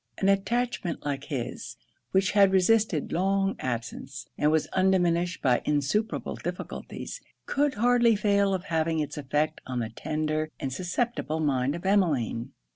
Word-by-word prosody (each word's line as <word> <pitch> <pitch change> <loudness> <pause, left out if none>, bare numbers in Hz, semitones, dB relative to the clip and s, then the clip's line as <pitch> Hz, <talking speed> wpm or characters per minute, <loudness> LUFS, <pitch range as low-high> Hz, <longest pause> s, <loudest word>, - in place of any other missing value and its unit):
An 195 - +2
attachment 195 -3 0
like 140 -1 -2
his, 135 -6 -5 0.3
which 190 0 +2
had 200 -2 +5
resisted 190 -3 +2
long 195 +2 +1
absence, 130 +2 -5
and 150 - +2
was 155 0 +2
undiminished 180 -2 +2
by 125 -2 +3
insuperable 150 +10 0
difficulties, - - -6 0.2
could 290 0 +1
hardly 235 +1 +4
fail 200 -1 +2
of 185 - -4
having 160 -2 0
it's 150 -2 -2
effect 150 +3 -1
on 130 -1 -3
the 115 -2 -2
tender 155 +5 -2
and 135 -1 -3
susceptible 180 - -2
mind 140 -2 +1
of 170 - -8
Emmeline. 150 - +1
170 Hz, 140 wpm, -27 LUFS, 145-195 Hz, 0.3 s, had